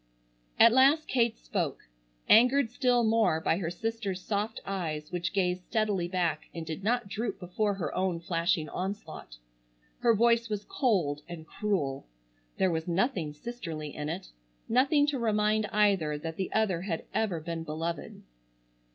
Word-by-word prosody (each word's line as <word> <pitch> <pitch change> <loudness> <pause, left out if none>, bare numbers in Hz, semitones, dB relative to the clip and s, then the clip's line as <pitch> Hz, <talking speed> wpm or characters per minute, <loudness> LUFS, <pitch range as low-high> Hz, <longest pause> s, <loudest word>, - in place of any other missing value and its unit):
At 230 - +8
last 275 +5 +5
Kate 235 -3 +1
spoke, 165 - -3 0.4
angered 250 +2 +5
still 245 -2 +2
more 220 -7 +3
by 165 - +1
her 175 -3 -2
sister's 205 0 -3
soft 210 +3 -2
eyes 160 -6 -4
which 175 -1 -2
gazed 180 -2 0
steadily 210 -6 0
back 175 -4 -1
and 165 -1 -5
did 160 +4 -6
not 240 +1 +1
droop 205 -1 -3
before 200 +3 -1
her 180 -5 -3
own 185 -3 0
flashing 170 -1 0
onslaught. 185 - -6 0.6
Her 235 -2 +4
voice 235 +1 +3
was 210 -1 -3
cold 200 - 0
and 165 -2 -8
cruel. 160 - -2 0.5
There 190 - +2
was 160 0 -2
nothing 175 - 0
sisterly 155 -4 -6
in 150 0 -4
it, 175 +4 -5 0.4
nothing 275 +5 +4
to 290 -3 -1
remind 215 -1 +1
either 195 -9 +2
that 160 +2 -5
the 190 - -3
other 200 -6 +1
had 175 -4 -3
ever 200 -7 0
been 165 +1 -5
beloved. 165 +2 -5
195 Hz, 150 wpm, -29 LUFS, 165-225 Hz, 0.6 s, At